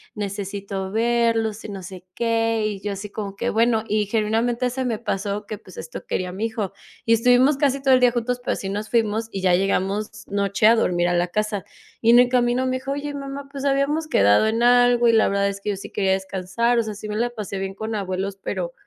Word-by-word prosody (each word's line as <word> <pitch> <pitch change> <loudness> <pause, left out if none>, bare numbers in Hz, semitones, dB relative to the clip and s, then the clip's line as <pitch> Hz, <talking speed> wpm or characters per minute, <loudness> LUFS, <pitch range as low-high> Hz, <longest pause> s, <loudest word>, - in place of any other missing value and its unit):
necesito 200 -1 -4
verlos 225 -1 +1
y - - -6
no 195 -2 -7
sé 180 0 -9
qué", 225 -1 +1
y 200 -2 -5
yo 205 - -3
así 200 +1 -7
como 200 -2 -5
que: 235 +4 -2
"Bueno", 225 0 +2
y 210 -1 0
genuinamente 230 +3 0
se 260 +1 -3
me 235 -3 -1
pasó 205 -2 -3
que 215 - -5
pues, 185 - -15
esto 160 - -8
quería 180 -1 -2
a - - -6
mi 210 +4 -2
hijo. 220 -4 -4 0.3
Y 230 - +4
estuvimos 250 +5 +4
casi 275 -1 +1
todo 270 -1 +4
el - - +3
día 245 -1 +5
juntos, 245 +1 -2
pero, - - 0
así 195 - -5
nos 210 +2 -4
fuimos 225 -1 0
y 195 - -4
ya 185 -1 +4
llegamos 195 +2 -1
noche 200 +1 +1
a 230 - +7
dormir 175 -5 +1
a - - +1
la 175 +1 +1
casa. 210 +1 -2 0.4
Y 230 0 +5
en 240 - +8
el 245 0 +5
camino 245 +1 +2
me 255 0 0
dijo: 265 +1 -5
"Oye, 290 +1 -3
mamá, 275 0 -7
pues, 280 -1 -5
habíamos 280 +3 +1
quedado 105 - +4
en 225 +2 0
algo 245 0 +5
y 230 - +5
la 220 - +4
verdad 200 0 +1
es 200 0 -6
que 210 - -2
yo - - -2
sí - - -9
quería 190 -2 +1
descansar. 195 +5 0
O - - +2
sea, 215 -1 -5
sí 215 - -8
me 210 - -3
la 240 +1 +1
pasé 200 -4 -5
bien 195 0 -4
con 220 +2 -4
abuelos, 195 0 -3
pero, - - -3
220 Hz, 240 wpm, -23 LUFS, 200-240 Hz, 0.4 s, en